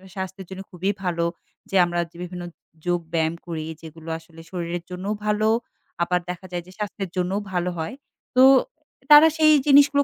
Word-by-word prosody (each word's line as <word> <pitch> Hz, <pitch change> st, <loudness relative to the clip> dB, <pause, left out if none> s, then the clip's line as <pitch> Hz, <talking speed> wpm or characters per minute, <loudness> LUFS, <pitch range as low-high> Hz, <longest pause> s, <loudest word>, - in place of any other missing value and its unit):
স্বাস্থ্যের 190 Hz, 0 st, -6 dB
জন্য 190 Hz, 0 st, -6 dB
খুবই 185 Hz, +2 st, -1 dB
ভালো। 170 Hz, -2 st, 0 dB, 0.5 s
যে -, -, -2 dB
আমরা 175 Hz, 0 st, -2 dB
যে 170 Hz, -, -16 dB
বিভিন্ন 180 Hz, 0 st, -6 dB, 0.4 s
যোগ 175 Hz, 0 st, +2 dB
ব্যায়াম 160 Hz, 0 st, +1 dB
করি। 160 Hz, -2 st, -4 dB, 0.2 s
যেগুলো 165 Hz, 0 st, -10 dB
আসলে 165 Hz, 0 st, -15 dB
শরীরের 175 Hz, -1 st, -3 dB
জন্যও 185 Hz, +3 st, -3 dB
ভালো। 210 Hz, +1 st, +2 dB, 0.5 s
আবার 180 Hz, +1 st, +1 dB
দেখা 180 Hz, +1 st, -5 dB
যায় 175 Hz, -1 st, -3 dB
যে, -, -, -13 dB
স্বাস্থ্যের 200 Hz, -2 st, -4 dB
জন্যও 185 Hz, +3 st, 0 dB
ভালো 180 Hz, 0 st, 0 dB
হয়। 160 Hz, +8 st, -4 dB, 0.4 s
তো 255 Hz, -, +8 dB, 0.7 s
তারা 295 Hz, +2 st, +11 dB
সেই 310 Hz, -1 st, +6 dB
জিনিসগুলো 285 Hz, 0 st, +6 dB
180 Hz, 165 wpm, -24 LUFS, 170-200 Hz, 0.7 s, তারা